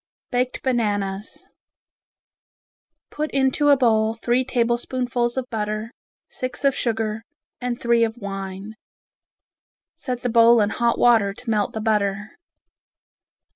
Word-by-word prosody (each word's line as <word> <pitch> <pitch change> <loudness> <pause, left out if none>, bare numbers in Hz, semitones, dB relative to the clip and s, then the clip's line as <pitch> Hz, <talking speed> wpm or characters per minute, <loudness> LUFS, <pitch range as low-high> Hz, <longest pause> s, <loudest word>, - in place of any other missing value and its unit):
Baked 250 0 -1
Bananas 205 -5 -2 1.7
Put 305 +1 -3
into 275 +2 +2
a 285 - +6
bowl 220 -3 +2
three 240 +2 +1
tablespoonfuls 240 0 -1
of 260 -1 -2
butter, 215 0 -3 0.4
six 255 +2 -4
of 275 - +4
sugar, 220 -2 -2 0.4
and 245 -1 -3
three 235 -1 +3
of 225 +1 -1
wine. 195 0 -6 1.2
Set 250 -3 -5
the - - 0
bowl 230 0 +6
in 210 0 +2
hot 235 -1 +1
water 220 -5 +4
to 245 +1 -9
melt 210 -2 0
the 220 - -4
butter. 210 -2 0
230 Hz, 120 wpm, -22 LUFS, 215-250 Hz, 1.7 s, a